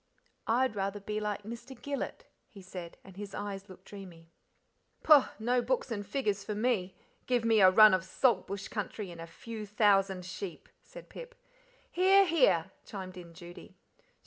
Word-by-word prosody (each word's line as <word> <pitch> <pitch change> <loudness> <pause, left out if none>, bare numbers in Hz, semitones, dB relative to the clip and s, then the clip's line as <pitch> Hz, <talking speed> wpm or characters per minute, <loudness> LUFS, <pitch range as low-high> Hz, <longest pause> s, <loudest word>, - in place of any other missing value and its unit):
"I'd 245 0 +2
rather 200 +1 -2
be 210 +1 -4
like 210 -1 -3
Mr. 235 +4 -9
Gillet," 285 -1 -5 0.2
he 215 -6 -14
said, 180 -2 -9
and 190 - -14
his 200 0 -8
eyes 200 -1 -6
looked 185 0 -14
dreamy. 175 -5 -12 0.7
"Pooh! 295 -4 +7
no 245 +3 +1
books 250 +1 -1
and 205 -2 -3
figures 205 -2 -2
far 210 +1 -4
me; 210 -5 0 0.3
give 245 -2 +1
me 225 -2 +4
a 185 - +9
run 215 +2 +8
of 185 -2 +1
Salt 235 +6 +1
Bush 200 +1 -5
country, 210 -2 -5
and 170 -1 -10
a 165 - -8
few 215 +5 -8
thousand 195 -3 +2
sheep," 185 -1 -7
said - - -13
Pip. - - -11 0.6
"Hear! 385 +2 +5
hear!" 195 - +3
chimed 185 -3 -8
in 170 -2 -11
Judy. 175 +1 -12
205 Hz, 170 wpm, -31 LUFS, 185-235 Hz, 0.7 s, a